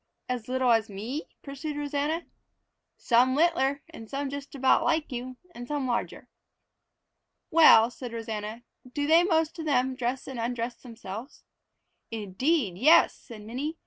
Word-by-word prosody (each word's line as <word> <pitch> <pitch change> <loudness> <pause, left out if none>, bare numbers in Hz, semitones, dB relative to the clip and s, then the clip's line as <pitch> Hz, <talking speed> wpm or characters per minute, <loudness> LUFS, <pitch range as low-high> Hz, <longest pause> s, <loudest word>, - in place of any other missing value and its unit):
"As 250 -3 -4
little 255 -1 +1
as 225 -2 +2
me?" 225 +10 -5 0.2
pursued 290 +2 -6
Rosanna. 295 +3 -2 0.7
"Some 250 +2 +3
littler, 285 -3 +2
and 225 -9 -11
some 275 0 -3
just 280 0 -7
about 265 -1 +3
like 320 -3 0
you, 250 +1 -6 0.2
and 245 -3 -8
some 290 -1 -2
larger." 240 -2 -3 1.2
"Well," 250 -8 +7
said 245 -1 -8
Rosanna, 225 0 -5 0.3
"do 290 -1 0
they 325 +3 +5
most 325 -2 +1
of 320 - -4
them 260 -3 +1
dress 255 +1 -3
and 265 -3 -6
undress 235 +1 -3
themselves?" 230 +1 -9 0.7
"Indeed 220 - -1
yes!" 310 +8 +6
said 220 -3 -12
Minnie. 270 +9 -4
260 Hz, 145 wpm, -27 LUFS, 230-295 Hz, 1.2 s, Well